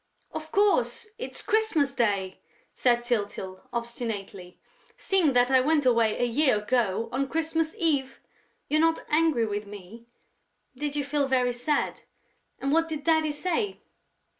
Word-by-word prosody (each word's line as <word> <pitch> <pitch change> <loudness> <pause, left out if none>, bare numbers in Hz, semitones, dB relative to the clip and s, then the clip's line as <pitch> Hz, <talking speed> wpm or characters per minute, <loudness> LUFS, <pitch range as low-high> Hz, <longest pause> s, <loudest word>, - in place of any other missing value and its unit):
"Of 315 0 -7
course, 410 +2 +2
it's - - -5
Christmas 430 -11 +1
Day," 200 -7 0 0.3
said 240 -1 +2
Tyltyl, 205 -5 -3
obstinately, 225 -6 -5 0.4
"seeing 360 -8 +2
that 245 +1 +3
I 260 -1 +5
went 295 +1 +2
away 230 -3 +3
a - - 0
year 250 0 +3
ago, 225 -1 0
on 270 +2 -1
Christmas 325 +1 -1
Eve!... 285 -8 0 0.5
You're 310 +1 +2
not 325 0 +1
angry 305 -6 +3
with 205 -1 -4
me?... 205 +3 -11 0.7
Did 290 +2 -3
you 290 - 0
feel 285 0 0
very 250 -2 +2
sad?... 245 +5 -1 0.6
And 275 +1 -2
what 330 +1 +2
did 305 -2 -4
Daddy 315 -1 +2
say?..." 370 +7 -2
265 Hz, 140 wpm, -27 LUFS, 230-315 Hz, 0.7 s, I